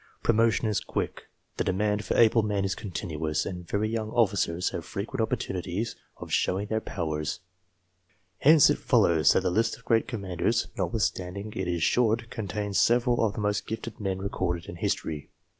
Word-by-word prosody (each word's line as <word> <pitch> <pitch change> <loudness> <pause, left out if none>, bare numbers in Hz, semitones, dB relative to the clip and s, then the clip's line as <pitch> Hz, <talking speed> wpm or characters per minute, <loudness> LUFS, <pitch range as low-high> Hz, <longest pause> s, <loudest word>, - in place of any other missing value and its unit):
Promotion 115 0 +3
is 105 - +1
quick, - - -4 0.3
the - - +1
demand 105 +3 0
for - - -1
able 115 0 +6
men 105 -2 0
is 95 - 0
continuous, 80 -6 -3
and 90 -2 -6
very 105 +1 0
young 110 -1 -2
officers 100 -6 +1
have - - -4
frequent 115 +5 -4
opportunities 95 0 -2 0.2
of - - -9
showing 95 +3 +1
their 110 0 0
powers. 80 -4 -3 1.0
Hence 150 0 +7
it - - -1
follows 80 -4 +4
that - - +3
the 90 -1 0
list 115 +4 +1
of - - -22
great 115 -1 +2
commanders, 100 +2 -1
notwithstanding 100 -2 -2
it 95 -3 -2
is 85 -2 -1
short, 115 +1 +2
contains 105 -2 -2
several 120 0 +3
of 105 -3 +1
the - - -3
most 105 0 -1
gifted 110 0 -5
men 95 -3 -2
recorded 90 -3 -2
in 85 - -8
history. 75 -3 -2
100 Hz, 170 wpm, -27 LUFS, 90-115 Hz, 1.0 s, Hence